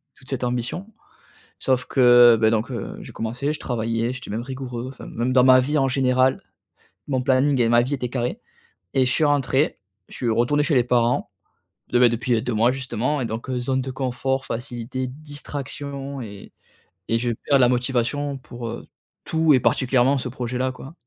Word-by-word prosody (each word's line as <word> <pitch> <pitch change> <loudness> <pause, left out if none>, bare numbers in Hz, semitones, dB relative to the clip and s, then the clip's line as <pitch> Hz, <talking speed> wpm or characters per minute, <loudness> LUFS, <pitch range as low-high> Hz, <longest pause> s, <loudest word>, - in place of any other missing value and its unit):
toute 135 -3 -14
cette 130 -2 -3
ambition 125 - -3 0.7
sauf 130 -1 +1
que, 120 -2 +7
beh, 110 - +4
donc 110 0 0
heu, - - -5
j'ai - - -10
commencé, 125 +6 -2
je - - -7
travaillais, 115 0 -1
j'étais 125 -2 -8
même 110 +3 -3
rigoureux, 125 -1 -6
enfin, 130 - -10
même 120 +3 -2
dans 125 -1 +5
ma 130 0 +7
vie 150 +4 0
en 135 - +2
général. 130 0 +2 0.7
Mon 130 -3 0
planning 130 +1 +2
et 115 - +3
ma 120 0 +5
vie 130 +4 -3
était 125 -3 -4
carré 125 - -3 0.5
et 130 -1 +4
je 125 - +1
suis - - +2
rentré, 145 0 +1 0.3
je - - -10
suis 120 - -1
retourné 120 +6 +2
chez 155 +1 +1
les 125 - +4
parents, 120 -1 +1 0.6
de 120 - +3
ben, 125 - +7
depuis 115 0 0
2 125 -1 -2
mois 115 +3 +3
justement 130 +2 -2
et 125 - -1
donc 115 +3 -5
heu, 125 -1 -1
zone 130 +1 0
de 130 - -5
confort, 130 0 -2
facilités, 120 +1 -4
distractions 140 -1 -6
et 100 -3 -10 0.6
et 115 - +2
je 120 0 -1
perds 135 +4 +1
la 125 - +6
motivation 130 +3 -1
pour, 120 -2 -8
heu, 115 - -7 0.4
tout 160 -1 +3
et 130 - +5
particulièrement 130 +2 +2
ce 125 -1 -3
projet-là, 125 +1 -2
quoi. 135 +4 -11
130 Hz, 190 wpm, -23 LUFS, 120-135 Hz, 0.7 s, que